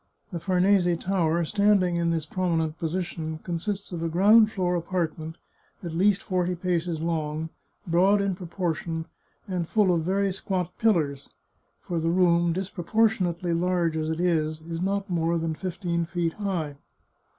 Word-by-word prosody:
The 175 - -3
Farnese 180 -1 +3
Tower, 170 -2 +1
standing 200 -2 +3
in 170 0 +1
this 165 -2 -1
prominent 160 -2 -1
position, 165 -2 -3
consists 190 +4 -3
of 170 -2 -4
a 165 - -1
ground 210 +6 +5
floor 180 -4 0
apartment, 165 -2 -2 0.5
at 170 -2 -5
least 195 +4 +2
forty 180 -2 0
paces 175 -2 -1
long, 160 -1 -2 0.4
broad 185 +4 +4
in 200 -1 0
proportion, 170 -2 -3 0.4
and 180 -4 -2
full 205 -5 +3
of 170 - +1
very 195 +3 +1
squat 180 -2 -3
pillars, 155 -11 +1 0.5
for 170 -2 -3
the 165 +1 0
room, 170 -1 +3
disproportionately 185 -1 0
large 170 -1 +1
as 155 0 -1
it 160 +1 -2
is, 155 -3 +1
is 165 +1 -5
not 200 +1 -1
more 170 -1 0
than 165 -1 -1
fifteen 170 -1 -2
feet 170 -1 -1
high. 175 -9 -3
175 Hz, 150 wpm, -26 LUFS, 165-190 Hz, 0.5 s, ground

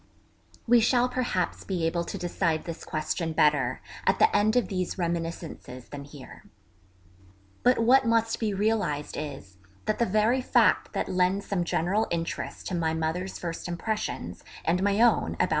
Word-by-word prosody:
We 240 +1 +6
shall 240 +2 +3
perhaps 245 -8 -1
be 180 -4 -2
able 170 +1 0
to - - -5
decide 170 -2 -1
this 170 -2 -7
question 160 +1 -2
better 145 -5 +2 0.3
at - - +4
the 435 - +4
end 215 +2 +3
of 245 -6 +3
these 185 -1 -3
reminiscences 165 -7 -4
than 140 -1 -7
here. 140 -2 -12 1.2
But 250 +1 +4
what 250 +3 +4
must 230 0 +2
be 220 -2 0
realised 200 -8 0
is, 135 -11 -7 0.3
that 215 - -1
the 235 - +3
very 215 +6 +2
fact - - +3
that - - -1
lends 185 +2 +1
some 190 -3 -1
general 180 +6 0
interest 165 -1 -4
to 185 - -2
my 160 -2 0
mother's 165 +4 -2
first 170 0 -5
impressions 210 +5 -4 0.2
and 175 +3 +2
my 200 +1 +2
own 240 +1 +4
about - - -1
M. - - 0
180 Hz, 165 wpm, -27 LUFS, 165-220 Hz, 1.2 s, We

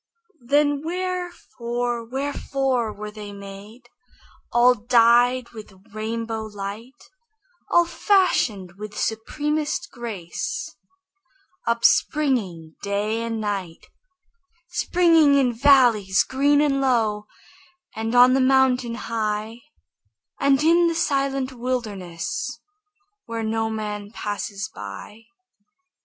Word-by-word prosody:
Then 290 +1 +2
wherefore, 320 -10 -3
wherefore 265 -1 -2
were 210 0 -8
they 210 -1 -9
made, 200 +4 -11 0.6
All 240 +1 +5
dyed 240 +2 +3
with 210 -4 -12
rainbow 225 +1 -3
light, 210 +5 -8 0.7
All 345 0 +4
fashioned 255 - +1
with 210 0 -8
supremest 295 +7 -2
grace, 235 - -5 0.9
Upspringing 205 - +1
day 205 +3 -1
and 230 -1 -3
night, 195 -6 -4 0.8
Springing 335 -4 +4
in 260 -3 +3
valleys 235 -7 +4
green 285 +2 +2
and 275 -2 +1
low, 220 -5 +1 0.7
And 225 +2 -2
on 250 +1 +7
the 265 - +3
mountain 260 -2 +3
high, 220 0 -3 0.8
And 275 +1 +3
in 340 +2 +5
the 335 - -1
silent 275 -4 0
wilderness, 235 - -4 0.7
Where 230 -1 -4
no 225 0 -1
man 210 -2 -5
passes 205 -1 -4
by? 105 - -9
235 Hz, 95 wpm, -23 LUFS, 210-275 Hz, 0.9 s, on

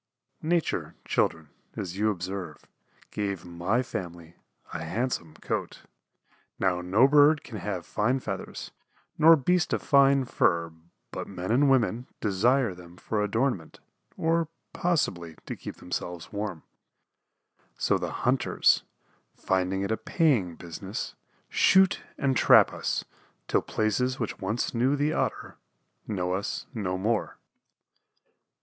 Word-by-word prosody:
Nature, 170 +1 -1
children, 80 -2 0 0.3
as 90 -2 -5
you 105 +2 +2
observe, 90 -4 -5 0.5
gave 100 -4 -3
my 90 +8 0
family 85 -8 -7 0.4
a - - -4
handsome 85 -2 -2
coat. - - -4 0.7
Now 90 -2 +1
no 100 +9 +4
bird 145 +1 +5
can 110 -5 -7
have 95 -2 -4
fine 125 +6 0
feathers, 100 -6 -6 0.5
nor 165 +2 +9
beast 175 +4 +1
a - - +3
fine 140 -1 +4
fur 85 -11 +1 0.4
but - - -5
men 95 0 -4
and 135 +4 +4
women 125 -2 +2
desire 115 +3 +2
them 90 0 -14
for 105 +3 -2
adornment, 105 - -1 0.4
or 165 0 +1 0.3
possibly 90 - -1
to - - -5
keep - - -8
themselves 90 +1 -5
warm. 100 -5 -4 1.1
So - - +1
the - - -3
hunters, 125 0 +3 0.5
finding 95 +1 0
it 100 - -2
a 110 - +1
paying 110 - +1
business, 90 +5 -6 0.3
shoot 190 -1 +4 0.2
and 135 -2 +1
trap - - +6
us - - -2 0.4
till - - +2
places 125 +4 0
which 115 - -3
once 105 +5 -2
knew 125 +4 +2
the 145 +2 +1
Otter - - -2 0.5
know 90 -4 -1
us 100 +4 -3
no 95 -5 -2
more. 110 +3 -1
105 Hz, 125 wpm, -27 LUFS, 90-130 Hz, 1.1 s, nor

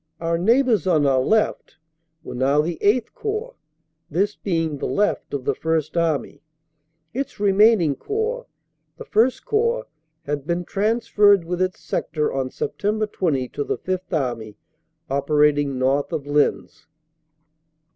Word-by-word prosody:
Our 165 0 -1
neighbors 230 - +3
on 155 -5 +3
our 135 -2 +3
left 215 +10 0 0.5
were - - -7
now 135 +4 +2
the 165 +1 -4
VIII 210 +5 +4
Corps, 435 +3 -4 0.6
this 200 +7 0
being 165 -6 -2
the - - -2
left 205 +1 0
of 140 -3 -4
the - - +1
First 160 -1 -1
Army. 165 -3 -1 0.7
Its 275 0 -4
remaining 200 -5 +4
Corps, 445 - -3 0.5
the 470 - -9
I 235 - +4 0.2
Corps, 465 +3 0 0.4
had 145 -1 -4
been 175 +1 -1
transferred 205 -2 +3
with 180 +2 -3
its 185 0 -1
sector 150 -2 -2
on 135 -1 -1
Sept. 210 +9 -2
20 140 -8 0
to 145 - -3
the - - -2
Fifth 185 0 -4
Army, 120 - -2 0.5
operating 145 0 +2
north 135 +2 +1
of 140 - -3
Lens. 145 0 0
170 Hz, 135 wpm, -22 LUFS, 145-215 Hz, 0.7 s, VIII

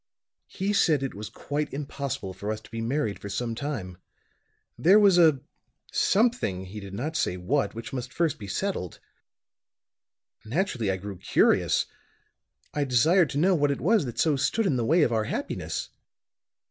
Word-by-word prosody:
He 200 +2 -2
said 155 -8 +3
it 135 - -3
was 105 +1 -7
quite 150 +1 -3
impossible 140 -8 -4
for 100 +3 -4
us 110 - -3
to - - -17
be 115 0 -4
married 115 -2 -1
for 100 - -7
some 115 +4 -2
time. 110 -9 -5 0.8
There 190 +6 +5
was 200 -4 +6
a 155 -6 +5 0.5
something 200 - +1
he 100 +3 -8
did 100 -1 -8
not 150 +9 -3
say 90 - 0
what 110 +9 0
which 115 +3 -7
must 125 -1 -4
first 160 -4 0
be 100 - -7
settled. 95 - -3 1.5
Naturally 125 - -1
I 95 - 0
grew 100 0 -7
curious. - - +3 0.9
I 145 - 0
desired 150 +7 +4
to - - -4
know 185 +6 +4
what 145 -4 +2
it 140 - -1
was 205 -1 +3
that 120 - -6
so 155 -3 +3
stood 220 +11 0
in 155 - +2
the 120 -2 0
way 160 +5 +4
of 120 - +1
our 110 -1 +1
happiness. - - -4
135 Hz, 170 wpm, -27 LUFS, 110-160 Hz, 1.5 s, was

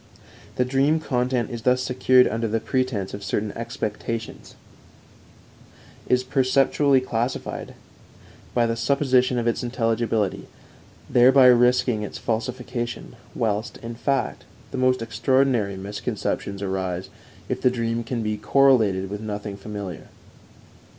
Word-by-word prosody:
The 125 - +1
dream 135 +5 +2
content 125 -3 -1
is 120 -1 -5
thus 125 +2 +2
secured 130 0 +4
under 115 +2 -1
the 110 +1 0
pretense 125 -6 -2
of 100 - -6
certain 105 +2 -2
expectations, 115 -1 -5 1.5
is 125 0 +2
perceptually 135 +1 +2
classified 120 +1 -3 0.8
by 120 -1 +3
the 115 0 0
supposition 130 0 +2
of 120 - -1
its 115 - 0
intelligibility, 115 -4 -1 0.6
thereby 130 +2 +6
risking 125 -2 +3
its 105 - -6
falsification, 120 +1 -4 0.2
whilst, 110 -1 -1
in 115 +1 -5
fact, 135 +4 -2 0.3
the - - -4
most 130 -2 +2
extraordinary 115 -2 +1
misconceptions 100 0 -4
arise 95 -1 -3 0.4
if 130 0 -3
the 130 - +4
dream 115 -1 -2
can 115 0 -3
be 105 0 -1
correlated 105 -5 +3
with 105 +2 -6
nothing 105 -1 -5
familiar. 100 -4 -7
120 Hz, 120 wpm, -24 LUFS, 105-130 Hz, 1.5 s, thereby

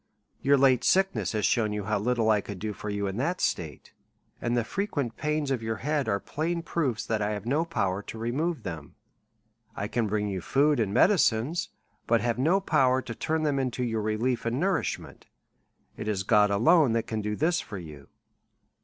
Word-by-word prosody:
Your 140 +1 +4
late 130 -2 +4
sickness 195 -6 +2
has 105 -3 0
shewn 110 +1 +1
you 105 -1 -3
how 105 +1 0
little 115 0 +1
I 105 -1 +3
could 100 -1 -7
do 105 +3 -4
for 105 - -6
you 100 0 -2
in 95 +1 -3
that 170 +9 -1
state; 80 -6 -3 0.5
and 120 0 0
the 120 - +2
frequent 145 - -3
pains 150 -2 -1
of 130 -4 0
your 110 0 -2
head 145 +2 -1
are 100 -1 +1
plain 165 - -3
proofs, 135 -11 -1
that 110 -1 -1
I 105 +1 0
have 105 0 -6
no 145 +7 +1
power 100 - -1
to 110 - -9
remove 140 +9 -2
them. 80 -4 -7 0.8
I 100 - -3
can 115 0 -1
bring 105 0 -1
you 95 -2 -3
food 145 - +2
and 105 -4 0
medicines, 160 - +2 0.4
but 115 0 +4
have 120 +2 -1
no 165 +9 +3
power 130 -8 +2
to 115 - -6
turn 160 +7 -1
them 145 -3 +1
into 125 -1 -2
your 115 -2 -1
relief 115 +3 -1
and 115 +3 -1
nourishment; 185 +1 -2 0.7
it 110 - -5
is 100 -3 -1
God 105 +1 +4
alone 120 - +4
that 115 -1 0
can 110 -1 -3
do 105 0 -2
this 165 +7 +1
for 105 - -8
you. 75 -6 -10
115 Hz, 200 wpm, -27 LUFS, 105-145 Hz, 0.8 s, Your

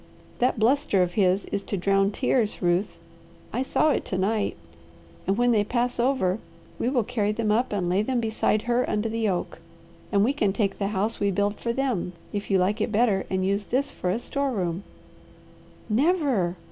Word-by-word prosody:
That 250 0 +2
bluster 225 -4 +3
of 175 - -2
his 190 0 +2
is 200 - -1
to 200 - -4
drown 195 +2 +2
tears, 230 0 0
Ruth; 175 +3 0 0.5
I 245 - 0
saw 305 +3 +2
it - - 0
to 185 - -3
night. 205 +2 0 0.7
And 195 +2 +1
when 245 0 +3
they 215 -3 +3
pass 245 +3 -1
over 235 -6 +1 0.4
we 240 - +1
will 255 -3 +1
carry 215 -2 0
them 215 0 0
up 240 +4 +1
and 195 -4 -1
lay 185 +3 +2
them 250 +3 0
beside 220 -1 0
her 240 +1 +1
under 210 +1 0
the 225 -1 0
oak, 180 -3 -3 0.5
and 200 -2 +3
we 255 +6 +2
can 210 -9 +1
take 200 -2 -1
the 200 - 0
house 210 +2 -1
we 200 - +2
build 205 +2 0
for 235 - -1
them, 235 -8 -1 0.2
if 205 -1 -4
you 195 - +4
like 200 +4 +1
it 215 - 0
better, 210 -3 +2
and 185 0 0
use 200 +1 0
this 275 +3 0
for 180 - -3
a 185 - +1
store 280 +3 -2
room." 180 -6 -2 1.1
"Never!" 250 - +1
210 Hz, 195 wpm, -25 LUFS, 195-245 Hz, 1.1 s, you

